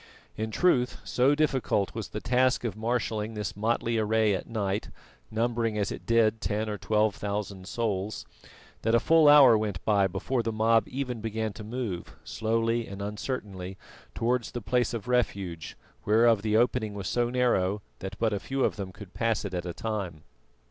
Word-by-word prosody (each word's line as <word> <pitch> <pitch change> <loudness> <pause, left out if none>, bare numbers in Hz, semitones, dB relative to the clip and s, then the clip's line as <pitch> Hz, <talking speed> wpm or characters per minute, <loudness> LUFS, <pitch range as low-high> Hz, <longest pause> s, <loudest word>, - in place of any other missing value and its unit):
In 110 0 -3
truth, 125 -1 +2
so 135 +3 +3
difficult 135 -9 +1
was 110 -2 -4
the 105 - -5
task 125 +1 +2
of 115 -5 -2
marshalling 110 -1 -2
this 105 -2 -4
motley 115 +2 0
array 110 -1 +2
at 95 - -4
night, 105 -3 -2 0.4
numbering 115 0 0
as 100 -1 0
it - - -8
did 110 -2 +3
ten 105 +2 -1
or 105 -1 -4
twelve 105 -1 +2
thousand 100 -2 -4
souls, 105 -3 -2 0.6
that 115 +1 +2
a - - +5
full 160 +2 +5
hour 140 -5 +9
went 105 -4 -2
by 100 -2 +3
before 100 +7 -1
the 115 - -2
mob 115 +1 +3
even 125 -3 -4
began 110 -1 -2
to 105 - -9
move, 110 -6 -5
slowly 115 +1 0
and 100 0 -8
uncertainly, 100 -3 -5 0.4
towards 120 +1 0
the 120 - -3
place 120 +3 +1
of 115 0 -6
refuge, 100 -9 -1 0.3
whereof 110 0 +4
the 110 0 +2
opening 110 -3 +1
was 100 -2 -4
so 120 -1 +1
narrow 105 -6 +1 0.2
that 95 - -6
but 115 -2 +1
few 135 0 -1
of - - +1
them 95 -2 -5
could 100 -1 -12
pass 115 -2 0
it 95 - -5
at 90 0 -3
a - - -2
time. 95 -9 -4
110 Hz, 175 wpm, -28 LUFS, 100-120 Hz, 0.6 s, hour